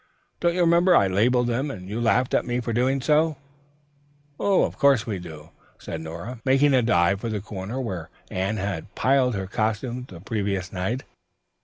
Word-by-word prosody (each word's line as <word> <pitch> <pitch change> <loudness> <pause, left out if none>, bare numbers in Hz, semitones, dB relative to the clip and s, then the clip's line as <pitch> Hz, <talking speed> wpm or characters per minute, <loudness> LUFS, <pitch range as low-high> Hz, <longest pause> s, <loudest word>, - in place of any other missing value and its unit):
"Don't 170 0 +1
you 180 - +1
remember, 170 +1 +5
I - - +5
labeled 120 +6 +2
them 120 +5 -1
and 90 -9 -7
you 110 +4 -3
laughed 125 +2 +2
at - - +3
me 120 0 -2
for 115 -1 -3
doing 130 +3 +1
so?" 155 +2 +2 1.0
"Of 200 -2 +2
course 140 -5 +4
we 105 -5 -3
do," 80 -3 -10 0.3
said 80 - -6
Nora, 85 +10 -7
making 135 +2 +4
a 130 - +5
dive 100 -3 +2
for 115 - -3
the 105 -1 -2
corner 105 +4 -6
where 90 -10 -4 0.2
Anne 95 +4 -1
had 100 -5 -4
piled 130 -3 +2
her 95 -1 -3
costumes 110 +5 -2
the 90 - -11
previous 100 -1 -3
night. 100 +8 -2
115 Hz, 180 wpm, -24 LUFS, 95-130 Hz, 1.0 s, remember